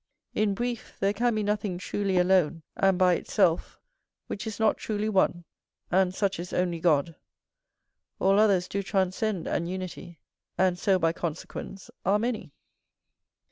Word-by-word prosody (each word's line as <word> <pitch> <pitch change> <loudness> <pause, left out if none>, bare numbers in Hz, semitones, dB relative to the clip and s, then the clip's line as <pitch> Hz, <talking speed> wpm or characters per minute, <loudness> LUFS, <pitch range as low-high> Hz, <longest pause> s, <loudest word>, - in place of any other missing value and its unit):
In 210 -2 +1
brief, 240 +1 -4
there 195 +1 +2
can 235 +2 +1
be 215 - 0
nothing 205 -3 -1
truly 190 +1 -1
alone, 180 -3 +3
and 195 -1 +3
by 180 -1 +5
its - - -4
self, 180 -5 +2 0.5
which 200 +2 -5
is 215 -1 -5
not 220 - +3
truly 215 -1 -2
one, 190 -4 +2 0.5
and 185 0 +3
such 195 0 -1
is 175 +1 -6
only 175 -2 0
God: 160 -1 +2 1.1
all 195 +2 +4
others 195 -4 +3
do 200 - -2
transcend 190 0 -1
an 170 - -1
unity, 180 -2 -6 0.4
and 180 -1 +2
so 195 0 +3
by 165 -2 +1
consequence 170 +4 -6
are 195 +3 +3
many. 225 -6 -3
190 Hz, 150 wpm, -27 LUFS, 180-205 Hz, 1.1 s, by